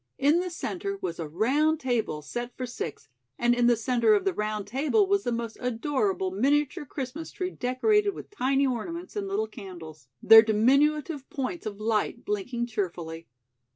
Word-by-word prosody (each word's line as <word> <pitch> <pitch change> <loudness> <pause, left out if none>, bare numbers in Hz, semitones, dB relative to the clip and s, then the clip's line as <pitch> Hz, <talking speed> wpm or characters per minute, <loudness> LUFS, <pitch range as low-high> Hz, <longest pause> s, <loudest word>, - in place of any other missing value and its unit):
In 295 +5 +4
the 365 0 -2
center 385 +3 -4
was 170 - -4
a 160 - -3
round 280 - +1
table 225 - -1
set 240 +9 -6
for 255 - -3
six, 155 - -6 0.3
and 240 0 +3
in 240 0 +3
the 240 - +5
center 245 - +3
of 400 -2 0
the 390 - +1
round 210 -3 -2
table 285 - +2
was 400 +1 +1
the - - -1
most 230 -1 -4
adorable 225 -6 -1
miniature 280 +8 +1
Christmas 280 +5 -5
tree 365 0 -3
decorated 405 - +1
with - - -10
tiny 275 -7 +1
ornaments 335 - -4
and 405 -1 -2
little 405 +3 0
candles, 170 - -11 0.2
their 225 0 +10
diminutive 275 +7 +2
points 275 +1 -4
of 205 -1 -6
light 215 -1 -1
blinking 235 +4 -2
cheerfully. 170 -7 -4
250 Hz, 170 wpm, -27 LUFS, 215-310 Hz, 0.3 s, their